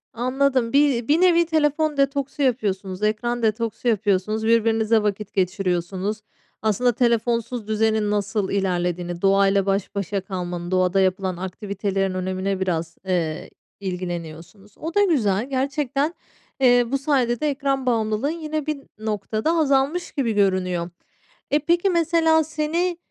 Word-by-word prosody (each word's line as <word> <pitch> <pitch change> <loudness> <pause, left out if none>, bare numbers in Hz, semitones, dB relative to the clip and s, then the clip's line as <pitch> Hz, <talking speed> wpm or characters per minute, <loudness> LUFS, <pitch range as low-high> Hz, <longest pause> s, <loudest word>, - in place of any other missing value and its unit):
Anladım. 255 0 +1
Bir 275 -5 +3
bir 310 +5 +3
nevi 340 -2 +5
telefon 310 -1 +1
detoksu 275 +1 0
yapıyorsunuz, 205 -7 -1
ekran 240 +3 0
detoksu 225 +2 -1
yapıyorsunuz, 215 0 +1
birbirinizle 225 -1 +3
vakit 210 0 -2
geçiriyorsunuz. 185 +1 -1 0.4
Aslında 220 +3 +2
telefonsuz 235 -1 0
düzenin 220 -1 +1
nasıl 205 -1 -1
ilerlediğini, 175 -2 -1
doğayla 195 0 +3
baş 195 +1 -1
başa 200 0 -2
kalmanın, 180 -2 -5
doğada 185 +1 +2
yapılan 185 -1 0
aktivitelerin 195 0 -2
önemine 185 +1 -2
biraz, 165 -3 -2
eee, 170 -4 -2 0.3
ilgileniyorsunuz. 180 +1 -6
O 325 +2 -5
da 410 - +4
güzel. 240 - +1
Gerçekten, 275 +3 -1 0.5
eee, 245 -2 +5
bu 275 - +2
sayede 265 -4 +1
de 305 -1 +1
ekran 275 -1 -1
bağımlılığın 225 +2 0
yine 310 -2 -3
bir 305 -1 -2 0.2
noktada 215 +5 -1
azalmış 290 +3 +1
gibi 250 -5 -1
görünüyor. 185 -3 +1 0.6
E, 295 - +4
peki, 345 +5 +2
mesela, 330 -2 +3
seni, 320 +3 -1
220 Hz, 125 wpm, -23 LUFS, 190-275 Hz, 0.6 s, nevi